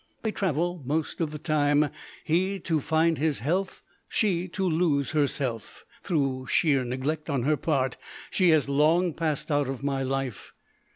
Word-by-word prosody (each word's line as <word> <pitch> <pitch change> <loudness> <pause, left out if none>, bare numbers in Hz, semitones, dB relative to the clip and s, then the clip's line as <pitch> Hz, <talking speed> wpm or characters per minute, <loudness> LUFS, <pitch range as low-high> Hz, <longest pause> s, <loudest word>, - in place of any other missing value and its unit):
They 220 - 0
travel 175 -3 -1
most 155 +5 -2
of 160 - 0
the 150 - -6
time, 150 -1 +2 0.3
he 185 +5 +1
to 160 -2 0
find 160 +2 +1
his 155 -1 +1
health, 185 +8 -2 0.2
she 185 -4 0
to 190 +2 -3
lose 160 -5 +1
herself. 135 -7 -2 0.2
Through 135 -5 -1
sheer 140 -4 +3
neglect 140 +6 -3
on 135 -5 0
her 150 +4 +3
part 135 -3 0 0.3
she 185 -2 +3
has 155 -3 +4
long 155 +5 +3
passed 155 -1 -2
out 145 -2 +1
of 135 0 -5
my 140 -1 0
life. 135 -4 -3
150 Hz, 160 wpm, -27 LUFS, 140-170 Hz, 0.3 s, has